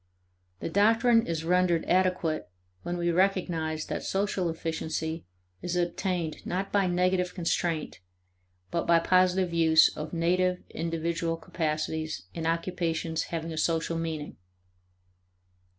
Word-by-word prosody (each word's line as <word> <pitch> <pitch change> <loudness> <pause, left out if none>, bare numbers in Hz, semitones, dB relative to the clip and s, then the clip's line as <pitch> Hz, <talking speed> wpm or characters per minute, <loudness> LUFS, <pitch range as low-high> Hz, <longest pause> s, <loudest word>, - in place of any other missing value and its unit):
The - - -3
doctrine 225 +3 +4
is 165 -1 -2
rendered 180 -1 +2
adequate 180 - +1 0.3
when 175 0 -3
we 175 0 +1
recognize 170 -4 0
that - - -3
social 195 -2 -1
efficiency 160 - -3 0.3
is 180 0 -3
attained 175 -2 -1
not 190 +2 -3
by 200 -2 +3
negative 180 0 +1
constraint 165 - -1 0.7
but 170 - -1
by 170 - +6
positive 185 +1 +3
use 160 -1 +5
of 155 0 -5
native 180 +2 +1
individual 165 0 -2
capacities 155 - -3
in 165 -1 -3
occupations 165 -1 -1
having 165 -1 -4
a 155 - -3
social 165 0 0
meaning. 160 -3 -4
170 Hz, 120 wpm, -28 LUFS, 160-180 Hz, 0.7 s, by